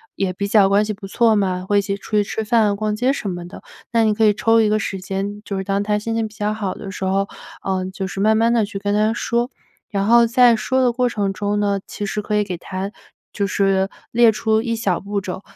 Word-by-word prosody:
也 190 Hz, -2 st, -1 dB
比 200 Hz, +2 st, -3 dB
较 200 Hz, -1 st, +5 dB
关 200 Hz, +1 st, +4 dB
系 215 Hz, -, -2 dB
不 195 Hz, -1 st, -9 dB
错 225 Hz, +2 st, +3 dB
嘛， 185 Hz, -3 st, 0 dB
会 205 Hz, 0 st, +3 dB
一 -, -, +2 dB
起 200 Hz, 0 st, -3 dB
出 200 Hz, -, -14 dB
去 210 Hz, -1 st, +3 dB
吃 220 Hz, +2 st, -3 dB
饭、 215 Hz, -2 st, +2 dB
逛 210 Hz, +1 st, -1 dB
街 250 Hz, +5 st, +1 dB
什 215 Hz, -7 st, -4 dB
么 175 Hz, -1 st, -5 dB
的。 175 Hz, -, -12 dB, 0.3 s
那 230 Hz, -1 st, +3 dB
你 215 Hz, -1 st, +3 dB
可 220 Hz, +1 st, +2 dB
以 210 Hz, -, +5 dB
抽 225 Hz, +2 st, +3 dB
一 215 Hz, -, +2 dB
个 215 Hz, -, +2 dB
时 200 Hz, -2 st, -3 dB
间， 195 Hz, +2 st, -4 dB
就 200 Hz, -2 st, -4 dB
是 190 Hz, -, -2 dB
当 195 Hz, +1 st, 0 dB
她 210 Hz, 0 st, 0 dB
心 225 Hz, +2 st, -3 dB
情 225 Hz, -1 st, 0 dB
比 215 Hz, -, -16 dB
较 210 Hz, +1 st, -1 dB
好 205 Hz, -3 st, -3 dB
的 195 Hz, -, -8 dB
时 190 Hz, -, -4 dB
候， 195 Hz, +1 st, +1 dB, 0.4 s
呃， 190 Hz, -1 st, -1 dB
就 190 Hz, -, -4 dB
是 195 Hz, -, -6 dB
慢 215 Hz, +2 st, +3 dB
慢 230 Hz, +1 st, +3 dB
地 230 Hz, -3 st, +2 dB
去 205 Hz, -1 st, -7 dB
跟 205 Hz, +1 st, -1 dB
她 215 Hz, +1 st, +2 dB
说。 235 Hz, +1 st, -1 dB, 0.4 s
然 200 Hz, -1 st, 0 dB
后 235 Hz, +2 st, +5 dB
在 240 Hz, 0 st, +5 dB
说 260 Hz, +4 st, 0 dB
的 250 Hz, -1 st, +3 dB
过 250 Hz, +1 st, +1 dB
程 205 Hz, -4 st, -1 dB
中 205 Hz, +1 st, -2 dB
呢， 200 Hz, -1 st, +1 dB
其 205 Hz, -, -5 dB
实 210 Hz, +1 st, -2 dB
可 210 Hz, 0 st, -2 dB
以 210 Hz, -, +3 dB
给 185 Hz, -3 st, -5 dB
她 190 Hz, +3 st, -5 dB, 0.4 s
就 200 Hz, -2 st, -1 dB
是 195 Hz, -1 st, +1 dB, 0.2 s
列 235 Hz, 0 st, +5 dB
出 220 Hz, 0 st, +1 dB
一 230 Hz, 0 st, -2 dB
小 200 Hz, -6 st, 0 dB
步 200 Hz, 0 st, -3 dB
骤 185 Hz, 0 st, -6 dB
205 Hz, 285 characters per minute, -20 LUFS, 195-220 Hz, 0.4 s, 较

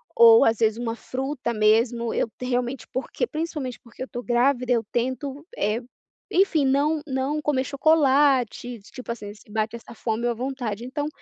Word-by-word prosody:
ou 465 Hz, -1 st, +8 dB
às 225 Hz, 0 st, +3 dB
vezes 220 Hz, -1 st, +2 dB
uma 230 Hz, -1 st, -3 dB
fruta 255 Hz, +1 st, -3 dB
mesmo. 225 Hz, +2 st, +2 dB
Eu -, -, 0 dB
t 250 Hz, -, -6 dB
realmente, 250 Hz, +1 st, -2 dB
porque, 265 Hz, -, -2 dB
principalmente 300 Hz, -, -4 dB
porque 235 Hz, 0 st, -9 dB
eu -, -, -4 dB
estou 245 Hz, -, -6 dB
grávida, 250 Hz, +1 st, +2 dB
eu 230 Hz, -2 st, +1 dB
tento, 265 Hz, +4 st, -2 dB
eh, 215 Hz, +3 st, 0 dB, 0.5 s
enfim, 360 Hz, -5 st, +3 dB
não 290 Hz, +3 st, +2 dB
não 270 Hz, +3 st, -1 dB
comer 285 Hz, -4 st, +1 dB
chocolate, 270 Hz, -4 st, +2 dB
tipo 255 Hz, -3 st, -6 dB
assim, 210 Hz, -3 st, -6 dB
se 210 Hz, -, -20 dB
bate 220 Hz, +1 st, -1 dB
essa 235 Hz, -, -13 dB
fome 225 Hz, +1 st, -2 dB
ou 240 Hz, -, +2 dB
a -, -, -1 dB
vontade. 240 Hz, -3 st, -4 dB
Então 290 Hz, +3 st, -3 dB
255 Hz, 175 wpm, -24 LUFS, 235-280 Hz, 0.5 s, ou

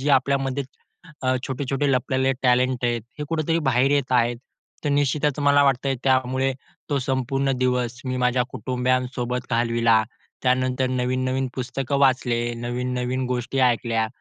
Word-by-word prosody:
जे 145 Hz, +2 st, 0 dB
आपल्यामध्ये 135 Hz, 0 st, +1 dB, 0.6 s
अ, 130 Hz, 0 st, +2 dB
छोटे-छोटे 135 Hz, +1 st, -1 dB
लपलेले 130 Hz, +1 st, +1 dB
टॅलेंट 125 Hz, 0 st, +2 dB
आहेत, 120 Hz, -2 st, 0 dB, 0.2 s
हे 150 Hz, -, -3 dB
कुठेतरी 165 Hz, 0 st, 0 dB
बाहेर 130 Hz, +3 st, +3 dB
येत 140 Hz, -3 st, +1 dB
आहेत. 120 Hz, -1 st, +2 dB, 0.5 s
तर 145 Hz, -, +1 dB
निश्चितच 145 Hz, 0 st, +1 dB
मला 145 Hz, 0 st, +5 dB
वाटतंय, 135 Hz, 0 st, +1 dB
त्यामुळे 130 Hz, 0 st, +2 dB, 0.4 s
तो 140 Hz, -, +2 dB
संपूर्ण 135 Hz, +1 st, -1 dB
दिवस 125 Hz, -1 st, 0 dB
मी 130 Hz, -, -1 dB
माझ्या 125 Hz, 0 st, +2 dB
कुटुंबयांसोबत 125 Hz, 0 st, -1 dB
घालविला. 115 Hz, -1 st, +3 dB, 0.4 s
त्यानंतर 130 Hz, 0 st, +1 dB
नवीन-नवीन 130 Hz, +1 st, -1 dB
पुस्तकं 135 Hz, +2 st, -2 dB
वाचले, 125 Hz, -3 st, +2 dB
नवीन-नवीन 125 Hz, +2 st, -2 dB
गोष्टी 125 Hz, +1 st, -2 dB
ऐकल्या, 115 Hz, -2 st, +2 dB
130 Hz, 130 wpm, -23 LUFS, 125-135 Hz, 0.6 s, मला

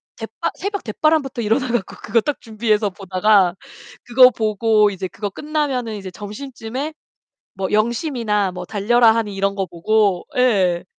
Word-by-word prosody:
댓 -, -, -7 dB
바 -, -, 0 dB
새벽 405 Hz, +1 st, -4 dB
댓바람부터 275 Hz, +1 st, 0 dB
일어나 230 Hz, +5 st, +1 dB
갖고 235 Hz, -6 st, -2 dB
그거 220 Hz, +2 st, +2 dB
딱 290 Hz, +5 st, -3 dB
준비해서 215 Hz, -2 st, 0 dB
보다가 190 Hz, -1 st, +2 dB, 0.5 s
그거 250 Hz, +1 st, +7 dB
보고 215 Hz, -1 st, +2 dB
이제 190 Hz, -1 st, -5 dB
그거 205 Hz, +3 st, -5 dB
끝나면은 270 Hz, -4 st, -2 dB
이제 195 Hz, -2 st, -7 dB
점심쯤에 240 Hz, -, -6 dB, 0.6 s
뭐 190 Hz, 0 st, -3 dB
영심이나 220 Hz, -, 0 dB
뭐 180 Hz, 0 st, -6 dB
달려라 220 Hz, +4 st, +3 dB
하니 215 Hz, -3 st, -2 dB
이런 195 Hz, 0 st, 0 dB
거 195 Hz, -1 st, -2 dB
보고 195 Hz, +1 st, +1 dB
예. 190 Hz, -9 st, +2 dB
215 Hz, 320 characters per minute, -20 LUFS, 195-245 Hz, 0.6 s, 그거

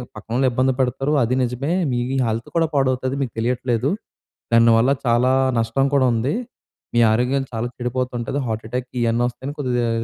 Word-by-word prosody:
పక్కనోళ్ళు 120 Hz, +5 st, -1 dB
ఇబ్బంది 130 Hz, +2 st, +2 dB
పెడతారు 135 Hz, +3 st, 0 dB
అది 125 Hz, +3 st, 0 dB
నిజమే. 125 Hz, +6 st, -2 dB, 0.2 s
మీ 120 Hz, -, 0 dB, 0.3 s
హెల్త్ 115 Hz, +1 st, -2 dB
కూడా 165 Hz, -1 st, +3 dB
పాడవుతది 130 Hz, -1 st, +1 dB
మీకు 125 Hz, -5 st, -3 dB
తెలియట్లేదు, 120 Hz, +1 st, 0 dB, 0.6 s
దానివల్ల 115 Hz, +2 st, +5 dB
చాలా 120 Hz, +2 st, +3 dB, 0.3 s
నష్టం 115 Hz, +5 st, +1 dB
కూడా 130 Hz, -2 st, +4 dB
ఉంది. 115 Hz, +5 st, 0 dB, 0.6 s
మీ -, -, +4 dB
ఆరోగ్యం 125 Hz, +4 st, +1 dB
చాలా 115 Hz, +1 st, -2 dB
చెడిపోతు 125 Hz, +1 st, -2 dB
ఉంటుంది 125 Hz, +4 st, -2 dB
హార్ట్ 110 Hz, -1 st, -3 dB
అటాక్ 125 Hz, +2 st, -3 dB
ఇవన్నీ 115 Hz, +1 st, +1 dB
వస్తాయని 130 Hz, +4 st, -6 dB
కొద్దిగా 125 Hz, -4 st, 0 dB
125 Hz, 155 wpm, -21 LUFS, 115-130 Hz, 0.6 s, దానివల్ల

